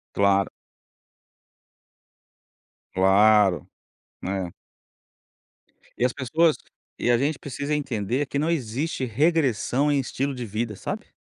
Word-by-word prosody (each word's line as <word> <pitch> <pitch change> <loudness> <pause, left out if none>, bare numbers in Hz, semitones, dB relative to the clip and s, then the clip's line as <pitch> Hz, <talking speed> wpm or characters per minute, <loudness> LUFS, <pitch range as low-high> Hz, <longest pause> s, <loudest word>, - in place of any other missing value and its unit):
Claro. 100 -1 +3 2.4
Claro, 95 -2 +4 0.6
é. 95 -2 -2 1.5
E 125 - +2
as 125 - 0
pessoas 155 +5 +2 0.4
e - - -1
a 120 - +5
gente 140 +3 0
precisa 145 +2 -4
entender 130 -2 -1
que 140 - -2
não 155 +3 0
existe 135 -1 -2
regressão 140 0 +1
em 140 - +2
estilo 135 +2 -2
de 125 -2 -5
vida, 110 +1 -3
sabe. - - -6
125 Hz, 105 wpm, -25 LUFS, 105-145 Hz, 2.4 s, a